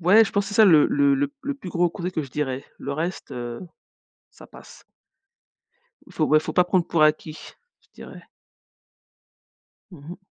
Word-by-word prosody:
ouais, 200 Hz, +6 st, +5 dB
je -, -, -7 dB
pense 200 Hz, 0 st, 0 dB
que -, -, -6 dB
c'est 205 Hz, -, -7 dB
ça 220 Hz, -, +6 dB
le 160 Hz, -6 st, +6 dB
le 280 Hz, +1 st, +2 dB
le 285 Hz, +1 st, 0 dB
p 285 Hz, -, -32 dB
le 285 Hz, 0 st, -3 dB
plus 230 Hz, -9 st, -10 dB
gros 175 Hz, -1 st, +1 dB
côté 180 Hz, -1 st, -5 dB
que 160 Hz, -4 st, -3 dB
je 135 Hz, -, -11 dB
dirais. 135 Hz, -1 st, -4 dB
Le 140 Hz, -, -5 dB
reste, 170 Hz, +5 st, -5 dB
heu, 120 Hz, -1 st, -6 dB, 0.7 s
ça -, -, -16 dB
passe. -, -, -16 dB, 1.2 s
Il -, -, -18 dB
faut, 155 Hz, -, 0 dB
ouais, 155 Hz, +1 st, +4 dB
faut 155 Hz, 0 st, -6 dB
pas 180 Hz, -, +4 dB
prendre 180 Hz, -1 st, 0 dB
pour 165 Hz, -2 st, -1 dB
acquis, 155 Hz, +1 st, 0 dB, 0.4 s
je -, -, -32 dB
dirais. -, -, -12 dB, 1.7 s
Mmh 150 Hz, -5 st, -14 dB
mh. 180 Hz, -, -8 dB
170 Hz, 200 wpm, -23 LUFS, 155-200 Hz, 1.7 s, ça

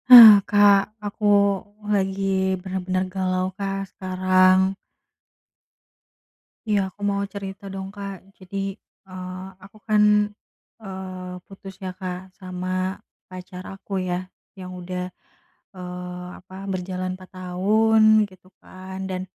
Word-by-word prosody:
Hah 235 Hz, -4 st, +13 dB, 0.2 s
Kak, 205 Hz, -1 st, +6 dB, 0.2 s
aku 205 Hz, +1 st, -4 dB, 0.7 s
lagi 190 Hz, -1 st, +1 dB
bener-bener 185 Hz, 0 st, -2 dB
galau 185 Hz, -1 st, 0 dB
Kak 195 Hz, -1 st, -2 dB
sekarang. 185 Hz, 0 st, +3 dB, 2.0 s
Iya 205 Hz, -1 st, +3 dB
aku 205 Hz, -, -21 dB
mau 200 Hz, 0 st, 0 dB
cerita 195 Hz, -1 st, -7 dB
dong 190 Hz, 0 st, -5 dB
Kak. 200 Hz, -1 st, -6 dB, 0.2 s
Jadi, 185 Hz, +1 st, -8 dB, 0.5 s
eee, 185 Hz, 0 st, -7 dB, 0.2 s
aku 200 Hz, +2 st, -15 dB
kan, 215 Hz, -1 st, +4 dB, 0.8 s
eee, 185 Hz, -2 st, -7 dB
putus 195 Hz, 0 st, -11 dB
ya 185 Hz, -, -3 dB
Kak 180 Hz, -2 st, -4 dB, 0.2 s
sama 185 Hz, 0 st, -3 dB, 0.3 s
pacar 185 Hz, 0 st, -9 dB
aku 195 Hz, +1 st, -10 dB, 0.2 s
ya 180 Hz, +1 st, -3 dB, 0.3 s
yang 185 Hz, 0 st, -7 dB
udah, 180 Hz, 0 st, -4 dB, 0.7 s
eee, 180 Hz, 0 st, -7 dB
apa 185 Hz, +1 st, -18 dB, 0.2 s
berjalan 185 Hz, 0 st, -3 dB
4 185 Hz, 0 st, -14 dB
tahun 210 Hz, +5 st, +2 dB, 0.3 s
gitu 185 Hz, 0 st, -19 dB
kan, 185 Hz, 0 st, -9 dB
dan 185 Hz, 0 st, -3 dB
185 Hz, 110 wpm, -24 LUFS, 185-195 Hz, 2.0 s, Hah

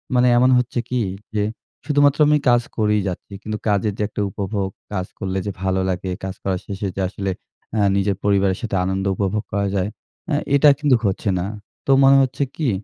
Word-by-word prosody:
মানে 125 Hz, 0 st, +4 dB
এমন 125 Hz, +1 st, +5 dB
হচ্ছে 125 Hz, 0 st, 0 dB
কি 125 Hz, -1 st, 0 dB, 0.4 s
যে 105 Hz, -, +2 dB, 0.4 s
শুধুমাত্র 145 Hz, 0 st, +3 dB
আমি 150 Hz, 0 st, +5 dB
কাজ 120 Hz, 0 st, +5 dB, 0.2 s
করেই 105 Hz, -1 st, +2 dB
যাচ্ছি। 95 Hz, +2 st, -6 dB
কিন্তু 110 Hz, -1 st, -4 dB
কাজের 105 Hz, 0 st, +1 dB
যে -, -, -1 dB
একটা 105 Hz, -, -4 dB
উপভোগ, 100 Hz, 0 st, -3 dB, 0.2 s
কাজ 95 Hz, -2 st, -1 dB
করলে 95 Hz, -1 st, -2 dB
যে 100 Hz, -, -2 dB
ভালো 95 Hz, 0 st, +1 dB
লাগে, 95 Hz, 0 st, -2 dB
কাজ 95 Hz, -1 st, -4 dB
করার 95 Hz, -2 st, -1 dB
শেষে 100 Hz, 0 st, -4 dB
যে -, -, 0 dB
আসলে 95 Hz, 0 st, -3 dB, 0.4 s
এ্যাঁ 105 Hz, -3 st, +3 dB
নিজের 100 Hz, 0 st, +1 dB
পরিবারের 100 Hz, -2 st, +2 dB
সাথে 110 Hz, -4 st, -3 dB
আনন্দ 95 Hz, +1 st, -1 dB
উপভোগ 100 Hz, +3 st, -1 dB
করা 100 Hz, 0 st, +1 dB
যায়। 95 Hz, +2 st, 0 dB, 0.4 s
এ্যাঁ 150 Hz, -2 st, +1 dB
এটা 145 Hz, +1 st, +7 dB
কিন্তু 145 Hz, -3 st, +4 dB
হচ্ছে 100 Hz, +1 st, 0 dB
না। 90 Hz, -, -2 dB, 0.4 s
তো -, -, +2 dB
মনে 135 Hz, 0 st, +7 dB
হচ্ছে 135 Hz, +2 st, -1 dB
কি 150 Hz, -5 st, 0 dB
105 Hz, 195 wpm, -21 LUFS, 95-125 Hz, 0.4 s, এটা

